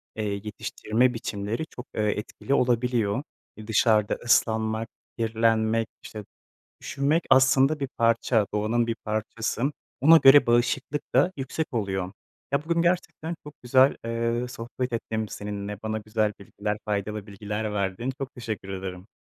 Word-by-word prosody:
eee, 110 - -3 0.2
yetiştirme 110 +3 0
biçimleri 110 +3 -3
çok, 125 - -9
eee, - - 0
etkili 105 +5 -2
olabiliyor. 125 -2 +1 0.3
E, 110 -1 -10
dışarıda 110 -2 +3
ıslanmak, 110 -2 +1 0.3
kirlenmek, 115 0 +1 0.2
işte, 105 -2 -8 0.6
üşümek, 145 +5 0
aslında, 135 +3 +5
bir 140 -2 -2
parça, 115 -1 +3
doğanın 115 +3 +1
bir 115 - -1
parçası. 110 +2 -2 0.4
Ona 160 +4 +8
göre 140 -1 +8
bağışıklık 120 +5 +1
da 140 +8 +5
yüksek 135 +3 -3
oluyor. 95 -4 -2 0.4
Ya, 140 +1 +1
bugün 170 0 +1
gerçekten 170 -1 -1
çok 150 - -10
güzel, 130 +2 +5
eee, 115 +1 -1
sohbet 125 +1 -5
ettim 110 -1 -2
seninle, 105 0 -5
bana 110 0 -2
güzel 105 0 -1
bilgiler, 105 +1 -4
faydalı 105 0 -3
bilgiler 105 +1 -4
verdin. 100 +5 -1
Çok 135 +1 -5
teşekkür 110 -5 -5
ederim. 95 0 -6
115 Hz, 135 wpm, -26 LUFS, 105-130 Hz, 0.6 s, Ona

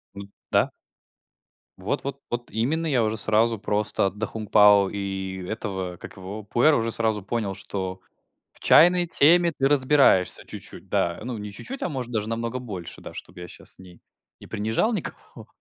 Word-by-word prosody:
М, 100 0 -8 0.2
да. - - +3 1.1
Вот 100 +10 -3
вот 140 0 -5
вот 120 0 -4
именно. 140 +10 0
Я 130 -7 +2
уже 110 0 -1
сразу 110 +2 +2
просто 105 -1 0
"Да 105 +2 -4
Хун 110 -2 -7
Пао" 105 -2 +6
и 95 -2 -4
этого, 95 -5 -4
как - - -11
его 95 +3 -7
"Пуэра" 120 +9 +3
уже 115 -2 0
сразу 110 -3 0
понял, 100 -2 -2
что 95 -1 -5 0.5
в - - -16
чайной 175 +1 +5
теме 170 +3 +5
ты 135 - +3
разбираешься 135 -9 +4
чуть-чуть, - - -9
да. 85 0 0
Не 110 -4 -5
чуть-чуть, 260 - -8
а - - -1
может 130 -5 -5
даже 110 -2 -2
намного 115 +2 -3
больше, 100 -9 -8
да, - - -9
чтоб 95 - -10
я 90 0 -8
щас - - -10
не 90 -2 -15 0.4
не - - -13
принижал 110 - 0
никого. 200 - -6
110 Hz, 170 wpm, -25 LUFS, 100-130 Hz, 1.1 s, Пао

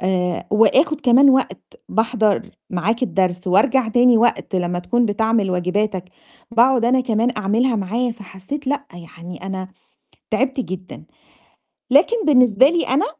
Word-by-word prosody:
آآ 180 -1 -2
وآخُد 260 +9 +2
كمان 270 +1 +5
وقت 265 0 0 0.3
باحضّر 220 -2 0 0.2
معاك 200 +7 -2
الدرس 185 -6 -1
وارجع 225 +7 +2
تاني 240 +1 +4
وقت 230 -4 0
لمّا 175 0 -2
تكون 235 +7 0
بتعمل 220 -1 0
واجباتِك، 185 +2 -2 0.5
باقعُد 240 +1 +3
أنا 255 +2 +2
كمان 230 -1 0
أعملها 225 +5 0
معاه، 225 +5 -2
فحسّيت 215 +6 -9
لأ، 285 +1 -2
يعني 175 +1 -12
أنا 190 -1 -6 0.6
تعبت 265 0 -1
جدًا، 185 -6 -7 0.9
لكن 340 - +4
بالنسبة 250 -3 +4
لي 335 +1 -1
أنا 265 +3 +1
220 Hz, 130 wpm, -19 LUFS, 190-255 Hz, 0.9 s, كمان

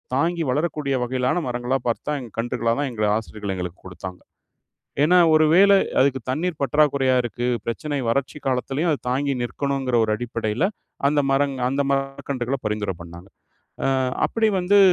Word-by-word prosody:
தாங்கி 170 +3 +1
வளரக்கூடிய 150 -1 0
வகையிலான 125 +6 0
மரங்களா 125 +2 -1
பார்த்து 115 - -1
தான், 140 -4 -2
கன்றுகளா 115 0 0
தான் 145 -1 0
எங்கள் 105 -3 0
ஆசிரியர்கள் 105 -3 -5
எங்களுக்கு 90 -1 -5
கொடுத்தாங்க. 90 0 -8 0.8
ஏன்னா, 180 +4 +5 0.2
ஒரு 155 0 +5
வேள 200 +3 +7 0.3
அதுக்கு 135 0 +3
தண்ணீர் 160 +5 -1
பற்றாக்குறையா 140 -1 +3
இருக்கு 120 +1 -3 0.2
பிரச்சனை, 145 +5 -3
வறட்சி 140 +4 -1
காலத்திலயும் 135 +5 0
அது 145 - 0
தாங்கி 140 +2 0
நிற்கணுங்கிற 135 0 -1
ஒரு 110 - +1
அடிப்படையில, 115 -1 -2 0.5
அந்த 150 - +2
மரங் 140 0 +2
அந்த 140 +2 0
மரக்கன்றுகள 135 -1 -2
பரிந்துரை 105 -3 -2
பண்ணாங்க. 85 +2 -11 0.6
அ - - +2 0.4
அப்டி 225 -1 +1
வந்து 190 +3 +4
130 Hz, 145 wpm, -23 LUFS, 115-145 Hz, 0.8 s, வேள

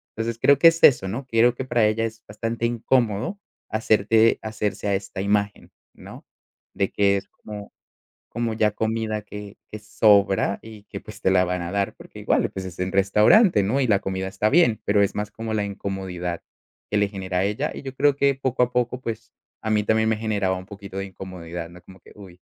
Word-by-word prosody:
entonces, 115 0 -3
creo 140 +1 +4
que 165 - +8
es 165 0 +3
eso, 110 -8 +6
¿no? 120 +8 -4
Creo 120 0 +3
que 130 - -5
para 120 -4 +2
ella 115 +1 0
es 115 0 -7
bastante 115 +3 -2
incómodo 120 - 0 0.3
hacerte 110 +1 +3
hacerse 105 -1 -3
a 100 - +1
esta 95 0 -3
imagen, 100 0 -1 0.2
¿no? - - -12 0.5
de 100 - 0
que 100 -1 +2
es 95 - -7
como 105 -1 -10 0.6
como 115 -1 -2
ya 105 -1 +2
comida 110 0 -2
que 105 0 -10
que 110 - -6
sobra 100 -2 +3
y 110 -2 -12
que, - - -8
pues, - - -12
te - - +2
la 90 -1 +4
van 90 0 -2
a 85 0 -5
dar 100 0 -1
porque - - -14
igual, - - +1
pues, 95 -1 -6
es 90 0 -9
en 90 +1 -2
restaurante, 105 - +5
¿no? 110 +8 0
Y 135 - +2
la 100 -3 +3
comida 95 -1 -3
está 95 +3 0
bien, 135 -7 +3
pero 100 0 +3
es 100 - 0
más 105 0 -3
como 110 0 -5
la 105 -1 0
incomodidad 95 -3 -5 0.5
que 105 - 0
le 100 - +2
genera 95 -2 -3
a - - +2
ella 105 +1 -1
y - - -8
yo 135 -1 -6
creo 145 +1 +3
que, 140 0 +3
poco 130 -2 0
a 125 - -1
poco, 125 0 -1
pues, 115 -4 -6 0.3
a 110 - -3
mí 105 -1 +2
también 110 +1 +2
me 110 - +1
generaba 105 -4 0
un 90 - -9
poquito 100 -1 -10
de 95 - -3
incomodidad, 90 -3 -8
¿no? 90 +1 -14
Como 95 +1 -16
que, - - -19
uy, 95 -4 -13
105 Hz, 215 wpm, -23 LUFS, 95-115 Hz, 0.6 s, que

